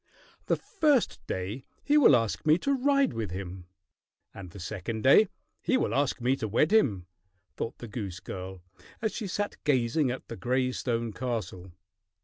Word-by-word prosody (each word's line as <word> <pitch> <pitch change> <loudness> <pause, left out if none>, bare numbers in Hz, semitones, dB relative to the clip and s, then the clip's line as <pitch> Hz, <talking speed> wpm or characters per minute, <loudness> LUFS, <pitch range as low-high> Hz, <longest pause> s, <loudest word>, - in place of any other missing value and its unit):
"The - - +3
first 295 -7 +1
day 100 +8 -4 0.2
he 290 - +2
will 275 - +7
ask 115 -3 0
me 155 +1 +5
to 280 +9 0
ride 275 +1 +2
with 110 -2 -3
him, 90 -1 -7 0.7
and 95 -2 -9
the 100 - -11
second 110 +4 -4
day 140 +11 +7 0.3
he 260 - +2
will - - 0
ask 140 -1 +1
me 125 +2 +2
to 110 - -3
wed 135 - +2
him," 105 - +3 0.5
thought 115 - -4
the 120 - -8
goose 100 -4 -5
girl, 95 -2 -7 0.4
as 220 -1 -1
she 215 - -4
sat 205 +2 -3
gazing 130 0 +2
at 125 +1 -5
the 115 - -6
gray 130 +1 0
stone 115 -3 -2
castle. 100 -8 -4
120 Hz, 170 wpm, -28 LUFS, 100-155 Hz, 0.7 s, will